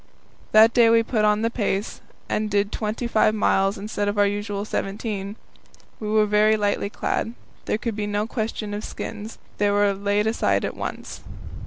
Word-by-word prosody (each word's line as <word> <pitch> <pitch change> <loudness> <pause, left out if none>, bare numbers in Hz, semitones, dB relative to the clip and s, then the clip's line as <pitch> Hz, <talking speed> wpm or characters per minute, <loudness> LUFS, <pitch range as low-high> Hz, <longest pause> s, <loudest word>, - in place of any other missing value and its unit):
That 220 +1 +7
day 235 -2 +6
we 230 0 +5
put 220 -2 +1
on 210 +1 +2
the 230 - +1
pace, 205 -3 -2 0.3
and 215 0 -1
did 205 0 +1
twenty 215 +2 -3
five 215 -2 +3
miles 195 -1 +2
instead 205 0 -3
of 205 +1 -1
our 205 - +5
usual 205 0 -2
seventeen. 200 -1 -3 0.6
We 215 - -4
were 215 0 +4
very 210 +1 +3
lightly 205 -1 0
clad. 225 +2 -2 0.3
There - - 0
could 225 -1 -3
be 210 -1 -2
no 205 +1 -1
question 220 -2 -4
of 210 +1 -4
skins; 215 +1 -7 0.2
they 205 0 +3
were 205 0 +3
laid 205 +1 0
aside 220 +1 +1
at - - -4
once. - - -6
210 Hz, 180 wpm, -23 LUFS, 205-220 Hz, 0.6 s, That